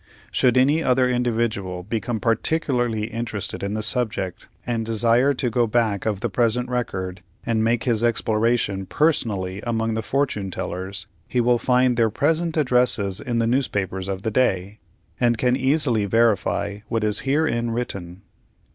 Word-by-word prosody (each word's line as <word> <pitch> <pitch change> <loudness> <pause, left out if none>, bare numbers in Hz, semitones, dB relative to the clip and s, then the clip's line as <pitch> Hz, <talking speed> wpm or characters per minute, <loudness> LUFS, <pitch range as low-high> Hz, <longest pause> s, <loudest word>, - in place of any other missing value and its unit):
Should 125 -1 +2
any 145 +5 +4
other 130 -3 +3
individual 115 -7 -1
become 110 +3 -3
particularly 120 -1 0
interested 110 -3 -4
in 100 +1 -3
the 110 - -2
subject, 105 -5 -1 0.2
and 115 -2 -1
desire 115 +5 +3
to 125 0 -1
go 120 +1 +2
back 110 -3 0
of 105 -3 -1
the 120 - 0
present 120 +4 0
record 95 -7 -3 0.2
and 115 -2 +1
make 115 +1 +1
his 115 -3 +1
exploration 110 -3 +1
personally 100 - 0
among 115 -1 -1
the 110 - -1
Fortune 110 -6 -1
tellers, 95 +1 -5 0.2
he 125 - -1
will 120 0 +3
find 125 -1 +2
their 115 -2 +3
present 160 +7 0
addresses 125 -8 +2
in 120 -4 -2
the 115 - +2
newspapers 100 -7 -1
of 95 0 -4
the 110 - -1
day, 100 -4 0 0.4
and 120 -2 +2
can 125 +2 +2
easily 130 -5 +2
verify 105 -2 +1
what 115 -2 -1
is 105 0 +2
herein 135 -4 0
written. 100 -6 -5
115 Hz, 155 wpm, -23 LUFS, 105-125 Hz, 0.4 s, any